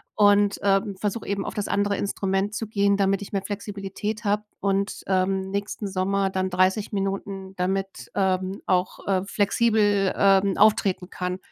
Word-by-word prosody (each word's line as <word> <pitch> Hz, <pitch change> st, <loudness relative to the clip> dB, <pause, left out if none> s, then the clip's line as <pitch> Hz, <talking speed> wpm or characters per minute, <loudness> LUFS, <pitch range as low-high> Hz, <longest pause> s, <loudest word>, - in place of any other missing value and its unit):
und, 205 Hz, -1 st, +4 dB
ähm, 195 Hz, 0 st, +2 dB
versuche 210 Hz, +1 st, -3 dB
eben 200 Hz, 0 st, -2 dB
auf -, -, -4 dB
das 205 Hz, -, -3 dB
andere 200 Hz, 0 st, 0 dB
Instrument 195 Hz, +1 st, -1 dB
zu 225 Hz, -, -2 dB
gehen, 200 Hz, -1 st, +2 dB
damit 195 Hz, 0 st, +1 dB
ich 200 Hz, -, -8 dB
mehr 195 Hz, -1 st, -1 dB
Flexibilität 205 Hz, +1 st, -5 dB
habe 205 Hz, +1 st, +2 dB, 0.2 s
und, 200 Hz, 0 st, -1 dB
ähm, 190 Hz, 0 st, 0 dB
nächsten 200 Hz, +1 st, -3 dB
Sommer 195 Hz, +1 st, 0 dB
dann 185 Hz, 0 st, -1 dB
30 185 Hz, +4 st, +1 dB
Minuten, 195 Hz, -1 st, -3 dB
damit, 195 Hz, +1 st, -2 dB
ähm, 190 Hz, 0 st, 0 dB
auch, 180 Hz, 0 st, 0 dB
äh, 190 Hz, -1 st, +1 dB
flexibel, 205 Hz, -1 st, +2 dB
ähm, 195 Hz, -1 st, +4 dB
auftreten 195 Hz, -3 st, +3 dB
kann. 180 Hz, 0 st, -3 dB
195 Hz, 155 wpm, -25 LUFS, 190-205 Hz, 0.2 s, und